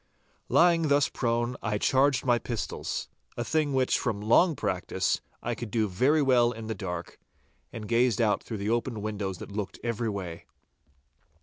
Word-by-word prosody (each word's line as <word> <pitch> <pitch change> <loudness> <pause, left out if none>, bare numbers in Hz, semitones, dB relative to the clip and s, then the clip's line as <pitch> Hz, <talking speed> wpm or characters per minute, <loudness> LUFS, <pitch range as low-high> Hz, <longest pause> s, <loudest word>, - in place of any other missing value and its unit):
Lying 170 -2 +4
thus 145 -1 +3
prone, 120 0 -1
I 105 -2 -1
charged 135 +3 +2
my 120 -2 +3
pistols—a 120 0 -5
thing 150 +4 0
which, 130 -1 +2
from 110 -5 -1
long 145 - +4
practice, 95 -3 -1 0.2
I 120 - -1
could 115 0 -6
do 110 +1 +1
very 130 +11 +2
well 120 -3 +4
in 115 -2 -7
the 110 - -2
dark, 90 -5 -6 0.5
and 110 -2 -7
gazed 120 0 +2
out 110 -3 +2
through 110 - -6
the 100 +1 -2
open 115 -2 -1
windows 100 -3 -3
that - - -9
looked 100 -1 -4
every 115 -1 -1
way. 90 -5 -6
115 Hz, 165 wpm, -28 LUFS, 105-130 Hz, 0.5 s, Lying